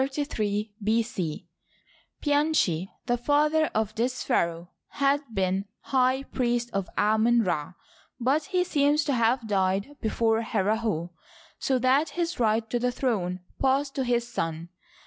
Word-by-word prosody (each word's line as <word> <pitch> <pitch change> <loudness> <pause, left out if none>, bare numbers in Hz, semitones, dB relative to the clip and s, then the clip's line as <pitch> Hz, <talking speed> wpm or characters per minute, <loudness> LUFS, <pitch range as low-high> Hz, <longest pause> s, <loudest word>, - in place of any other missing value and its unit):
Pianchi, 290 - +1 0.2
the 245 -1 +1
father 300 +2 +3
of 215 -1 -1
this 250 +3 -1
pharaoh, 170 -7 0 0.2
had 280 0 +1
been 190 -1 0 0.2
high 260 0 +1
priest 240 -3 -1
of 195 -2 -2
Amon 220 +3 +3
Ra; 175 -3 -2 0.5
but 275 +6 +1
he 365 -1 +1
seems 295 -3 +2
to 285 - 0
have 235 0 +2
died 195 +6 0
be 220 - 0
fore 225 0 +1
Herihor, 210 -5 -1 0.5
so 265 - +1
that 260 +5 +3
his 345 -3 -1
right 225 -1 +2
to 240 - +1
the 250 +1 +1
throne 195 -9 -1 0.2
passed 275 +1 +1
to 270 - -1
his 240 -1 0
son. 165 -6 -3
240 Hz, 130 wpm, -27 LUFS, 200-275 Hz, 0.5 s, father